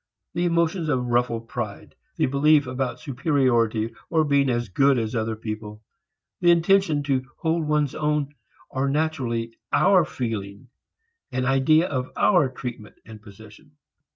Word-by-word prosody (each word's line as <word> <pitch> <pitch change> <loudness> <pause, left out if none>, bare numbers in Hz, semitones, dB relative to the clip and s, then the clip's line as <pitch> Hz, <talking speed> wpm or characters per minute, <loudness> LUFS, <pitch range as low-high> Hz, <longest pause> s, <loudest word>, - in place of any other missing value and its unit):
The 175 - 0
emotions 170 -1 0
of 130 -3 0
ruffled 120 -1 0
pride, 110 -5 -6 0.2
the - - +1
belief 145 +2 +3
about 130 +1 -3
superiority 120 -6 0 0.2
or 160 -2 +2
being 140 -2 +2
"as 120 -1 -1
good 135 +7 +3
as 110 0 -2
other 110 -1 -1
people," 110 -1 -7 0.6
the 175 - +3
intention 170 -3 +3
to 135 -2 0
hold 160 -1 -1
one's 150 -2 +1
own 150 -1 -1 0.4
are 135 +1 -1
naturally 130 -7 -1 0.2
our 190 -3 +4
feeling 110 -4 -5 0.6
and 130 0 -1
idea 150 +6 +3
of 130 -3 -3
our 175 -9 +4
treatment 120 -4 -8
and 110 -1 -12
position. 110 +6 -15
130 Hz, 140 wpm, -24 LUFS, 115-150 Hz, 0.6 s, our